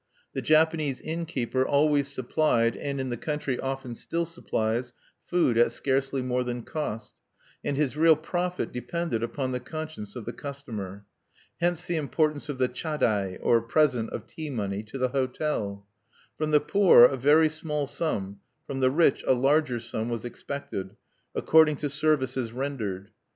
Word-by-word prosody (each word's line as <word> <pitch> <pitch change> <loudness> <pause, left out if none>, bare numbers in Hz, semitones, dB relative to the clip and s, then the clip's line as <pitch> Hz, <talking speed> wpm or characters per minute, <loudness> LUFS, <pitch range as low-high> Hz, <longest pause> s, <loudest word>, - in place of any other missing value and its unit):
The - - -2
Japanese 155 -3 +2
innkeeper 155 -6 -2
always 145 0 +3
supplied 130 -3 +1
(and 140 -1 -3
in 130 -1 -2
the 120 - -2
country 150 -2 -2
often 135 -2 -4
still 170 +8 -2
supplies) 120 -7 -2 0.3
food 165 -10 +2
at 120 - +5
scarcely 135 -1 0
more 125 0 0
than 120 -1 -4
cost; 130 -8 -4 0.5
and 140 - -1
his 145 -2 +1
real 160 +1 +6
profit 175 +3 -2
depended 125 +1 -2
upon 130 +3 -2
the 125 - -2
conscience 150 -6 -7
of 120 -4 -6
the 120 - -5
customer. 110 -9 -7 0.5
Hence 175 0 0
the 170 - -1
importance 155 0 0
of 145 - -3
the 130 -1 +2
chadai, 120 - -1
or 115 -1 +4
present 125 -2 +2
of - - -6
tea 155 -2 -7
money, 100 -6 -2
to 110 +5 -7
the 130 -1 +1
hotel. 125 -6 -2 0.5
From 155 0 -1
the 150 -1 +5
poor 190 -7 +6
a 130 +3 +7
very 145 +5 +5
small 150 -1 -2
sum, 100 - -3 0.3
from 135 - -4
the 130 -1 +4
rich 150 0 +3
a - - +6
larger 135 0 +2
sum, 115 0 -3
was 120 0 -3
expected, 120 -6 -6 0.4
according 160 -1 +5
to 145 0 -3
services 135 -5 0
rendered. 110 -7 -4
135 Hz, 160 wpm, -27 LUFS, 120-155 Hz, 0.5 s, a